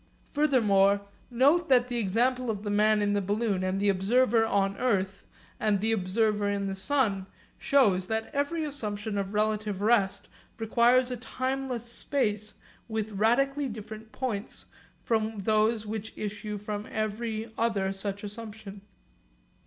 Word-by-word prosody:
Furthermore 205 -9 +3 0.3
note 280 +8 +3
that 250 -2 +5
the 245 -1 -3
example 245 +5 +1
of 210 -2 -3
the 205 - -2
man 210 0 +3
in 205 0 +1
the 205 - +1
balloon, 195 -2 0
the 200 +1 +1
observer 225 +4 +3
on 200 -2 +1
earth, 195 -6 -1 0.3
and 210 -2 +2
the 220 +3 +1
observer 210 +1 +1
in 200 -1 -1
the 195 - -2
sun, 195 -3 0 0.3
shows 205 -10 +3
that 220 +1 -2
every 285 +3 -1
assumption 215 -7 -3
of 200 0 -3
relative 215 -2 0
rest 200 -2 +2 0.3
requires 240 +3 +3
a 250 - -3
timeless 255 0 -3
space 215 -4 -2 0.3
with 220 -1 -3
radically 270 +7 +1
different 220 0 -9
points 220 -5 -4 0.4
from 220 -1 0
those 215 +2 +1
which 220 0 -5
issue 210 0 -4
from 210 +1 -5
every 220 +1 -3
other 200 -4 0
such 200 +1 -4
assumption. 210 -1 -8
215 Hz, 135 wpm, -28 LUFS, 200-235 Hz, 0.4 s, that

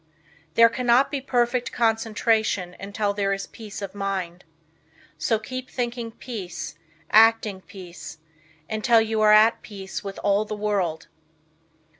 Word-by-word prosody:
There 230 0 +8
cannot 245 +3 +2
be 280 -2 -2
perfect 245 -2 0
concentration 220 -4 0
until 200 +1 -2
there 200 -1 0
is 195 0 -4
peace 210 -2 -9
of 195 - -6
mind. 190 -3 -4 0.8
So 225 - +1
keep 255 +4 -7
thinking 240 -2 -3
peace, 195 -11 -7 0.4
acting 220 -3 +4
peace, 180 -4 -10 0.5
until 225 +2 +3
you 220 0 0
are 215 0 +6
at 215 +2 +5
peace 195 -2 -7
with 195 -1 -6
all 205 +1 +3
the 215 0 -5
world. 200 -6 -1
215 Hz, 130 wpm, -24 LUFS, 195-230 Hz, 0.8 s, There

